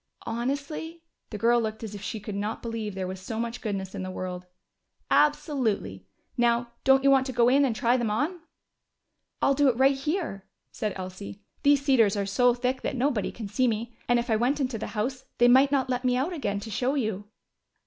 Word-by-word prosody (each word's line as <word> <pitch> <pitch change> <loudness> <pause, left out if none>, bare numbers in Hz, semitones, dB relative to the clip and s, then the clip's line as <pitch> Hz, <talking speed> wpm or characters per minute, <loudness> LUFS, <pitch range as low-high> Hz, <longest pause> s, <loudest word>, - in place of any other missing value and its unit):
"Honestly?" 280 +7 -4 0.3
The 210 - -5
girl 235 +2 +3
looked 220 0 -4
as 215 -2 -6
if 205 - -7
she 215 +1 -4
could 210 0 -7
not 205 +2 -3
believe 225 -4 -4
there 190 -1 -3
was 185 0 -6
so 220 +3 -5
much 235 +1 -3
goodness 195 -4 -4
in 200 - -5
the 185 - -4
world. 180 -1 -5 0.6
"Absolutely! 230 - +1 0.3
Now 235 0 +2
don't 270 0 +5
you 275 - +5
want 265 0 +4
to - - -3
go 240 -2 +3
in 275 +3 +4
and 250 -5 +1
try 240 +3 +2
them 235 -3 -1
on?" 295 - -1 1.0
"I'll 275 - +4
do 285 0 +4
it 235 - 0
right 270 +1 +4
here," 285 - -3 0.2
said 210 -2 -3
Elsie. 190 +2 -8 0.2
"These 285 -1 +3
cedars 225 -7 +4
are 200 - 0
so 245 +5 +3
thick 250 +1 -1
that - - -2
nobody 250 -5 0
can 220 -3 -7
see 250 +6 +1
me. 230 +1 -2
And 245 - +4
if 240 0 -1
I - - +4
went 255 +6 +1
into 255 -5 -1
the - - -4
house 255 +5 -2
they 240 - +5
might 265 +3 +6
not 270 -2 +2
let 250 0 -1
me 250 -1 +2
out 290 +8 -1
again 205 -11 -2
to 220 +1 -7
show 250 +7 0
you." 215 -6 -2
240 Hz, 215 wpm, -27 LUFS, 210-265 Hz, 1.0 s, might